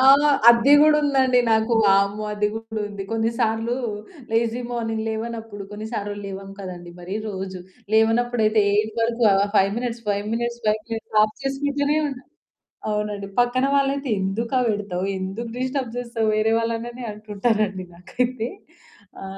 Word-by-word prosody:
ఆ! - - +3 0.5
అద్ది 235 +4 +6
గూడ 305 0 +6
ఉందండి 265 -3 +3
నాకు 220 +1 +2
వామ్మో! 200 +1 +3
అది 210 0 +1
కూడా 225 -1 -5
ఉంది. 200 -1 -6
కొన్నిసార్లు 225 +1 0 0.6
లేజీ 230 +1 +1
మార్నింగ్ 225 -2 -2
లేవనప్పుడు 225 -2 -5
కొన్ని 210 +1 -6
సార్లు 205 -2 -3
లేవం 195 0 -7
కదండీ! 175 -2 -8
మరీ 185 +3 -4
రోజు. 190 -1 -5 0.4
లేవనప్పుడైతే 225 -1 +3
8 215 +1 +1
వరకు 230 +1 +1
ఆహ్, 195 +1 +3
5 195 0 +4
మినిట్స్, 240 -1 -4
5 205 0 0
మినిట్స్, 235 0 -3
5 215 0 +2
మినిట్స్ 225 -1 -2
ఆఫ్ 215 0 +1
చేసుకుంటూనే 285 +2 0
ఉంటా. 270 -1 -8 0.7
అవునండి. 210 -1 -2
పక్కన 245 +2 +3
వాళ్ళైతే, 275 0 +1
"ఎందుకా 230 +7 -1
పెడతావు? 200 -3 -2
ఎందుకు 195 +5 -4
డిస్టర్బ్ 255 -2 -2
చేస్తావు? 235 -2 -2
వేరే 215 +1 +2
వాళ్ళనని" 230 +2 -3
అంటుంటారండి 210 -2 -1
నాకైతే. 235 +7 -2 0.7
ఆ! - - -6
225 Hz, 140 wpm, -23 LUFS, 205-240 Hz, 0.7 s, అద్ది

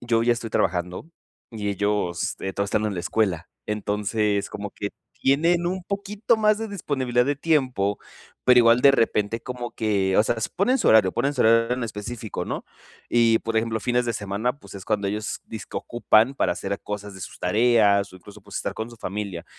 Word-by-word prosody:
yo 115 -1 +1
ya 120 - +4
estoy 115 -1 -5
trabajando 90 - -1 0.4
y 105 -2 -3
ellos, 100 -3 -1
eh, 95 - -3
todos 100 +1 -1
están 105 +2 0
en 105 - -2
la 90 - -3
escuela. 90 -2 -1 0.2
Entonces 105 0 -1
como 105 0 -6
que 100 - -4 0.3
tienen 170 +6 +3
un 185 +1 -2
poquito 200 +4 -1
más 215 -1 +3
de 225 0 -4
disponibilidad 130 - 0
de 145 +1 0
tiempo, 130 -11 +1 0.5
pero, 125 -1 +6
igual 115 0 +6
de 140 +1 +7
repente, 115 -3 +1
como 125 -1 -6
que, 100 -4 0
o 105 - +6
sea, 115 - 0 0.2
ponen 245 +8 +2
su - - 0
horario 105 -4 +6
ponen 140 +4 -1
su 130 - -2
horario 115 +1 +4
en 125 - -2
específico, 110 0 -5
¿no? - - -4 0.4
Y, 115 -1 +4
por 115 0 -3
ejemplo, 110 0 0
fines 125 +2 +1
de 120 - -1
semana, 105 +5 -2
pues, 140 - -14
es 95 - -9
cuando 105 -2 0
ellos 105 +1 -3
disque 110 - -7
ocupan 120 +2 +2
para - - +1
hacer 100 0 -4
cosas 105 -1 -6
de 95 - -10
sus 85 - -9
tareas, 100 -1 +3
o - - -11
incluso, 100 +3 -14
pues, 100 0 -14
estar - - -2
con 110 +1 -4
su 120 - -12
familia. 100 -4 -5
110 Hz, 200 wpm, -24 LUFS, 100-125 Hz, 0.5 s, de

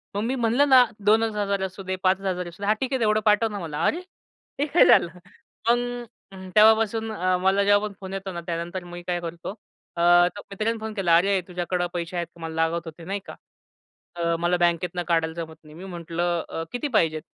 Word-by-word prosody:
मग 205 - 0
मी 255 +3 -1
म्हणलं 245 +4 +2
ना, 260 -2 +8 0.2
"2,000 210 -2 +2
चं 190 - -1
असूदे 190 0 -5
5,000 190 0 +2
चं 175 - -8
असू 175 +4 -12
दे, 200 - -1
हा 215 - +5
ठीक 265 0 -2
आहे 260 - 0
एवढं 215 0 +3
पाठव 215 +1 +4
ना 205 - -4
मला 155 -4 -4
अरे? 340 - +1 0.6
हे 290 - +2
काय 335 - +5
झालं. 175 - +6 0.6
मग 245 0 0 0.5
तेव्हापासून 220 +1 +4
अ, 185 -3 0
मला 195 +2 +3
जेव्हा 205 +1 +3
पण 200 - -10
फोन 190 0 -7
येतो 195 0 -5
ना 170 - -5
त्यानंतर 175 +2 -4
मी 175 0 -9
काय 175 -1 0
करतो 170 +4 -6 0.4
अ, 170 - -2 0.5
मित्रांनी 220 +3 -2
फोन 220 0 -5
केला, 175 -5 +3
"अरे, 195 +2 +2
तुझ्याकडं 180 0 -2
पैसे 175 +1 -4
आहेत 170 - -2
मला 165 -1 -6
लागत 165 +1 0
होते 165 +1 -10
नाही 195 +2 -3
का. - - -9 0.8
अ, 170 -1 0
मला 175 +1 +1
बँकेतनं 175 0 0
काढायला 165 -2 +1
जमत 160 -1 -6
नाही." 155 0 -15
मी 180 - -10
म्हटलं, 175 -1 -2
"अ, 165 - -4
किती 245 +4 -2
पाहिजेत?" 155 -4 +2
185 Hz, 205 wpm, -24 LUFS, 170-215 Hz, 0.8 s, ना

